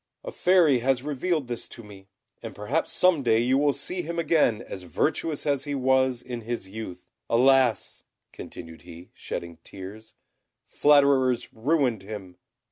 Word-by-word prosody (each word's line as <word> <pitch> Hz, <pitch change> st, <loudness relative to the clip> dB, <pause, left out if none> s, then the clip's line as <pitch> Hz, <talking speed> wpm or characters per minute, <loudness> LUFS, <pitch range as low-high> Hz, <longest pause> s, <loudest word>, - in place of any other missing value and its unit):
A -, -, -6 dB
Fairy 175 Hz, -, +4 dB
has 130 Hz, +1 st, 0 dB
revealed 150 Hz, +2 st, -1 dB
this 120 Hz, -1 st, -5 dB
to 115 Hz, -, -11 dB
me, 100 Hz, -2 st, -14 dB, 0.3 s
and -, -, -8 dB
perhaps 120 Hz, +11 st, -2 dB
some 180 Hz, -5 st, +3 dB
day 115 Hz, -4 st, +3 dB
you 125 Hz, +4 st, +2 dB
will 145 Hz, 0 st, +3 dB
see 180 Hz, +6 st, -3 dB
him 170 Hz, 0 st, -5 dB
again 155 Hz, -9 st, +2 dB
as 95 Hz, -, -7 dB
virtuous 150 Hz, -, -2 dB
as 140 Hz, -1 st, 0 dB
he 145 Hz, -1 st, -3 dB
was 130 Hz, -2 st, +1 dB
in 120 Hz, -2 st, -6 dB
his 115 Hz, -3 st, -5 dB
youth. 95 Hz, -3 st, -8 dB, 0.2 s
Alas!" 125 Hz, -2 st, +3 dB, 0.3 s
continued 80 Hz, 0 st, -10 dB
he, 85 Hz, 0 st, -13 dB
shedding 85 Hz, -1 st, -6 dB
tears, 100 Hz, +3 st, -10 dB, 0.5 s
"flatterers 140 Hz, -4 st, +3 dB
ruined 125 Hz, -2 st, 0 dB
him. 95 Hz, -3 st, -9 dB
125 Hz, 150 wpm, -26 LUFS, 110-145 Hz, 0.5 s, Fairy